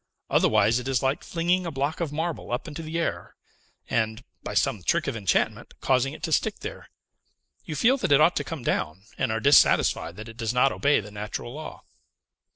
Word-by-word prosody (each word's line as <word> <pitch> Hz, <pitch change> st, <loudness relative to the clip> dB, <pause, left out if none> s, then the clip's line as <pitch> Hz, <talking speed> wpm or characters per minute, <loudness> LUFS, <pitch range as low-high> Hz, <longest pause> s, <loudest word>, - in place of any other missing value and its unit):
Otherwise, 115 Hz, +3 st, +3 dB
it 125 Hz, -, -7 dB
is 135 Hz, -2 st, 0 dB
like 135 Hz, +2 st, 0 dB
flinging 175 Hz, +2 st, 0 dB
a 170 Hz, -, -3 dB
block 140 Hz, +1 st, -2 dB
of 165 Hz, -4 st, -2 dB
marble 160 Hz, -1 st, -3 dB
up 125 Hz, -, -2 dB
into 155 Hz, +1 st, -6 dB
the 160 Hz, +1 st, -4 dB
air, 170 Hz, -, -3 dB, 0.5 s
and, 110 Hz, 0 st, -1 dB, 0.2 s
by -, -, -6 dB
some -, -, +1 dB
trick -, -, +1 dB
of -, -, -2 dB
enchantment, 100 Hz, -5 st, -1 dB
causing 130 Hz, +1 st, +1 dB
it -, -, -11 dB
to -, -, -2 dB
stick -, -, 0 dB
there. -, -, -8 dB, 0.8 s
You 155 Hz, -, -5 dB
feel 240 Hz, -, +3 dB
that 245 Hz, -, -2 dB
it 140 Hz, -, +6 dB
ought 165 Hz, +3 st, +5 dB
to -, -, 0 dB
come 160 Hz, -7 st, -6 dB
down, 90 Hz, -3 st, -2 dB, 0.2 s
and -, -, +1 dB
are 110 Hz, -, 0 dB
dissatisfied 140 Hz, -9 st, +4 dB
that 110 Hz, +3 st, -9 dB
it 115 Hz, 0 st, -11 dB
does 115 Hz, +1 st, -2 dB
not 130 Hz, +2 st, +4 dB
obey 145 Hz, -4 st, +2 dB
the 105 Hz, +1 st, -11 dB
natural 105 Hz, +3 st, -6 dB
law." 155 Hz, +2 st, -8 dB
135 Hz, 205 wpm, -26 LUFS, 115-160 Hz, 0.8 s, it